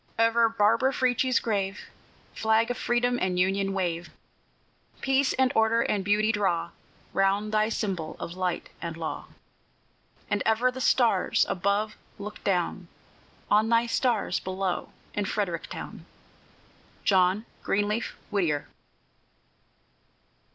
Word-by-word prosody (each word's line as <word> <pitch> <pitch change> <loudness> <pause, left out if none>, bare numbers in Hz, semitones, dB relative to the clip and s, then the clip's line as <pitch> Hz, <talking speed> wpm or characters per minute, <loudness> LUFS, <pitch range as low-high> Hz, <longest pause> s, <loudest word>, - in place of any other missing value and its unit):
Over 230 0 +4
Barbara 230 +4 +3
Frietchie's 255 0 +2
grave, 200 -3 -2 0.5
Flag 220 +2 +2
of 245 - -3
Freedom 245 +1 +1
and 185 -1 0
Union, 195 +2 +1
wave! 175 -3 -2 0.9
Peace 270 0 +2
and 260 -1 +2
order 225 +1 +3
and 200 -2 0
beauty 210 +2 +2
draw 175 -6 0 0.4
Round 200 +2 +1
thy 215 0 +2
symbol 185 -8 -3
of 170 - -5
light 185 -2 -2
and 165 -1 -5
law; 160 -1 -5 1.0
And 205 -1 0
ever 225 +3 +2
the 260 +1 -7
stars 235 -8 +3
above 200 +3 0 0.2
look 210 +1 -8
down 180 -1 0 0.6
On 215 +2 +4
thy 230 0 +4
stars 235 -2 +1
below 185 -1 -3 0.2
in 205 - -1
Frederick 190 -5 -2
town! - - -8 1.0
JOHN 190 +2 +3 0.2
GREENLEAF 210 +3 -1 0.2
WHITTIER. 165 -8 0
205 Hz, 115 wpm, -27 LUFS, 190-230 Hz, 1.0 s, Over